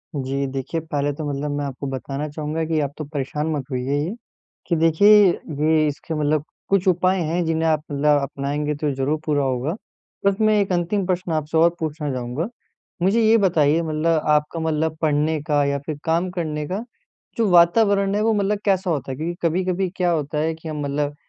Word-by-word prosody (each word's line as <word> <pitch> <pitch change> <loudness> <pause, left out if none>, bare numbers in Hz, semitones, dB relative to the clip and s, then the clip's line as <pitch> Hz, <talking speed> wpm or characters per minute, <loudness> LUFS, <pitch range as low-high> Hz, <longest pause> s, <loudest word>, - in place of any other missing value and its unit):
जी, 135 0 -2
देखिए 135 +4 -3
पहले 145 -2 -1
तो 155 - -6
मतलब 145 +1 -3
मैं 145 0 -2
आपको 140 0 -5
बताना 135 +2 -4
चाहूँगा 155 +2 -3
की 160 -1 0
आप 145 -1 -2
तो 155 - -5
परेशान 150 +1 -3
मत 145 -3 -2
होइए 130 +2 -1
ये 170 +9 -2 0.5
कि 170 - +1
देखिए, 165 +5 +4 0.2
ये 155 -1 +1
इसके 150 +3 -4
मतलब 150 0 +1 0.3
कुछ 195 -1 +2
उपाय 185 +1 +3
हैं, 170 +3 0
जिन्हें 160 0 0
आप 155 -1 +1
मतलब 145 0 +3
अपनाएँगे 145 +2 -2
तो 150 0 -1
ज़रूर 140 +4 0
पूरा 145 -2 +1
होगा। 130 +5 -1 0.5
बस 200 -1 +4
मैं 215 -1 +4
एक 195 - -2
अंतिम 180 +3 0
प्रश्न 180 -2 -1
आपसे 155 0 -1
और 165 +1 +6
पूछना 155 -2 -3
चाहूँगा 125 +7 -3 0.5
मुझे 195 +6 +3
ये 225 +1 +5
बताइए 165 -5 +3
मतलब 160 0 0
आपका 150 +2 +1
मतलब 160 0 -1
पढ़ने 155 0 +1
का 145 -1 +3
या 140 0 0
फिर 155 -2 -4
काम 170 +3 +1
करने 155 -4 -3
का, 195 +6 -3 0.5
जो 225 -3 +2
वातावरण 195 +3 +4
है 210 - +1
वो 225 +1 +2
मतलब 205 0 0
कैसा 190 -2 +1
होता 140 -5 -2
है? 130 - -5
क्योंकि 170 +3 -3
कभी-कभी 185 +2 0
क्या 180 -1 +2
होता 150 -2 -2
है 160 +1 0
कि 160 0 -11
हम 150 -1 -4
मतलब 145 +1 -2
155 Hz, 195 wpm, -22 LUFS, 145-175 Hz, 0.5 s, और